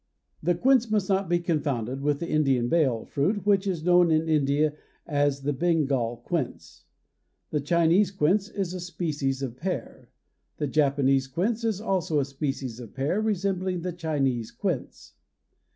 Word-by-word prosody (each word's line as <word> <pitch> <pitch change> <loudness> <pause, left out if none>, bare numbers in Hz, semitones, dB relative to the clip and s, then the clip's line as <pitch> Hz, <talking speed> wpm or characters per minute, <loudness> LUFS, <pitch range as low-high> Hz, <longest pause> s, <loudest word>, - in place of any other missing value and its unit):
The 175 +2 +1
quince 245 +4 +3
must 210 -3 0
not 195 -2 +1
be 175 - +3
confounded 140 -7 -2
with 145 0 +1
the 170 - -2
Indian 135 -7 +2
"bael" 130 -9 +2
fruit 190 +9 -1
which 200 -1 +3
is 175 -5 -2
known 175 0 +5
in 160 0 +2
India 150 0 +2 0.3
as 145 -2 0
the 145 +1 0
Bengal 135 -7 0
quince. 165 -8 -4 0.7
The 150 - 0
Chinese 170 +5 +3
quince 195 +2 +1
is 195 -4 -3
a 185 - -4
species 150 -6 -2
of 125 -2 -5
pear. 185 +4 -5 0.5
The 150 - -1
Japanese 135 -2 +2
quince 205 - -1
is 220 -4 0
also 185 -8 0
a 140 - +1
species 135 -3 -4
of 120 -2 -11
pear 145 +10 0
resembling 190 -3 -1
the 180 0 -3
Chinese 140 -9 -1
quince. - - -4
155 Hz, 155 wpm, -26 LUFS, 135-185 Hz, 0.7 s, known